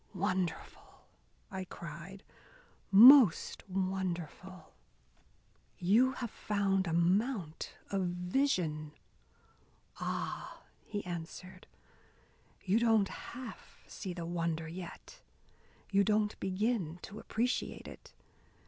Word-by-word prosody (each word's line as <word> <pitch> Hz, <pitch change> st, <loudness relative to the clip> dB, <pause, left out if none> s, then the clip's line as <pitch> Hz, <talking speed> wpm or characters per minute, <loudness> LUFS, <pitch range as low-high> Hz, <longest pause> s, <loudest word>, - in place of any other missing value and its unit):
"Wonderful!" 185 Hz, -2 st, -3 dB, 0.5 s
I 190 Hz, -1 st, -4 dB
cried. 170 Hz, +3 st, -9 dB, 0.7 s
"Most 230 Hz, -, +8 dB
wonderful! 185 Hz, -2 st, -4 dB, 1.0 s
You 230 Hz, +9 st, +4 dB
have 240 Hz, -4 st, -5 dB
found 195 Hz, -2 st, 0 dB
a -, -, -1 dB
mount 180 Hz, -, 0 dB, 0.2 s
of 195 Hz, -2 st, 0 dB
vision." 175 Hz, -, -1 dB, 1.1 s
"Ah," -, -, -4 dB, 0.2 s
he 205 Hz, -3 st, -4 dB
answered, 180 Hz, +1 st, -7 dB, 1.0 s
"you 200 Hz, +4 st, +3 dB
don't 225 Hz, -4 st, +3 dB
half 250 Hz, -1 st, -9 dB
see 190 Hz, -, -6 dB
the 170 Hz, -2 st, -5 dB
wonder 165 Hz, -1 st, -2 dB
yet, 180 Hz, -, -9 dB, 0.7 s
you 200 Hz, 0 st, +4 dB
don't 210 Hz, +1 st, +1 dB
begin 190 Hz, -3 st, -1 dB
to 210 Hz, -, -8 dB
appreciate 240 Hz, +4 st, -2 dB
it. -, -, -12 dB
190 Hz, 90 wpm, -33 LUFS, 175-210 Hz, 1.1 s, Most